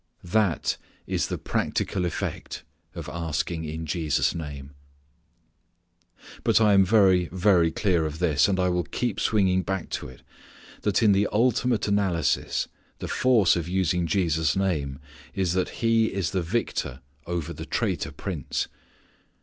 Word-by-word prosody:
That 90 -3 +1 0.3
is - - -1
the - - -3
practical 90 -2 -1
effect 85 - -4 0.3
of - - -6
asking 80 0 -3
in 80 +1 -5
Jesus' 80 -2 0
name. 70 -4 -7 1.7
But - - +4
I 105 -2 +5
am 95 -1 +6
very, 95 -3 +4
very 90 -2 +3
clear 85 -2 +1
of 75 0 -6
this, 80 -5 +3
and 95 -2 0
I 90 0 +2 0.2
keep 120 -5 -2
swinging 95 -4 +2
back 95 0 -4
to - - -3
it 65 - -14 0.6
that - - +1
in 105 - +6
the 100 +1 +3
ultimate 120 0 +2
analysis 95 -7 +1 0.3
the - - -6
force 120 -8 +3
of 85 -1 -3
using 90 -2 +1
Jesus' 80 -3 +1
name 75 -9 -1 0.4
is 95 -3 0
that 95 0 0 0.2
He 115 -1 +4
is 95 -2 -2
the 95 -1 0
victor 85 - -2 0.3
over 85 -3 -3
the - - -8
traitor - - -1
prince. 85 -9 -3
90 Hz, 140 wpm, -26 LUFS, 80-100 Hz, 1.7 s, am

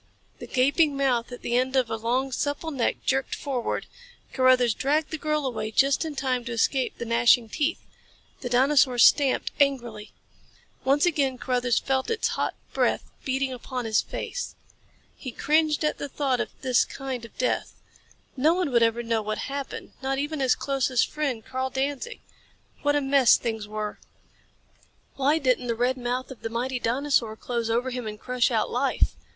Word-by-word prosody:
The - - -8
gaping 280 +3 +2
mouth 250 -4 +1
at 245 - -9
the 240 - -1
end 260 +2 +1
of 260 -3 +3
a - - 0
long, 245 +4 -1
supple 290 +5 -2
neck 260 -5 -1
jerked 270 0 0
forward. 260 -4 -3 0.5
Carruthers 255 -3 +4
dragged 300 +6 0
the 315 - -2
girl 305 -1 -1
away 235 -4 -2
just 270 +7 +3
in 315 -2 -5
time 255 -3 -1
to 240 - -5
escape 250 +3 0
the 235 - -5
gnashing 235 0 +4
teeth. 305 +7 -1 0.5
The 245 - -5
dinosaur 260 0 +4
stamped 270 +3 +4
angrily. 240 -7 0 0.7
Once 280 +4 +3
again 280 -6 +1
Carruthers 245 -1 0
felt 265 -1 0
its 455 -1 0
hot - - -2 0.2
breath - - 0
beating 265 0 -1
upon 250 0 -5
his 220 -1 +2
face. - - -5 0.6
He 260 - -7
cringed 305 +3 +1
at 300 - 0
the 285 - -4
thought 270 -3 0
of - - -2
this 255 -2 +3
kind 265 -3 -6
of 230 - -12
death. 255 - -1 0.6
No 305 +5 +3
one 360 -6 -1
would 235 -1 +4
ever 230 +1 +2
know 230 -2 0
how 210 - -6
it 215 - -1
happened. 280 -1 -5
Not 270 0 -1
even 295 +2 -2
his 260 -2 +3
closest 265 -3 0
friend, 275 -8 -2
Karl 260 0 -2
Danzig! 280 - -3 0.6
What 290 0 +2
a 290 - +2
mess 270 -2 +5
things 220 -3 -4
were. 210 0 -5 1.2
Why 280 +3 +2
didn't 255 -4 +1
the 235 - 0
red 245 +3 +1
mouth 250 +1 -3
of 260 - -11
the 225 - -3
mighty 250 +3 -2
dinosaur 240 -2 +1
close 235 0 -3
over 245 +3 0
him 245 -2 -4
and 210 0 -6
crush 250 0 +1
out - - 0
life? - - +1
260 Hz, 180 wpm, -26 LUFS, 240-280 Hz, 1.2 s, mess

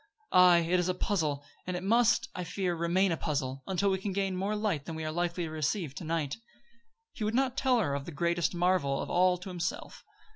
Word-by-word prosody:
Aye, 180 -2 +6
it 180 +1 +3
is 175 +1 0
a 180 - 0
puzzle; 155 -8 -1 0.2
and 180 -1 -2
it 180 - -6
must, 230 +3 +3
I 180 - -4
fear, 180 0 -2
remain 175 +3 +2
a 165 - 0
puzzle, 135 -4 -2
until 195 +1 +1
we 190 - 0
can 195 0 -3
gain 195 -1 -1
more 195 +3 -1
light 205 -9 -1
than 165 - -6
we 160 0 -4
are 155 - -2
likely 175 +1 -1
to 160 - -4
receive 155 0 -2
to 155 - -7
night." 160 -2 -2 0.8
He 220 - -5
would 215 +2 0
not 260 0 +1
tell 260 -3 +2
her 160 -11 0
of 140 0 -3
the - - -7
greatest 170 +3 0
marvel 175 -6 +1
of - - -4
all 180 0 +4
to 180 +2 -9
himself. 235 - -4
180 Hz, 230 wpm, -30 LUFS, 160-195 Hz, 0.8 s, Aye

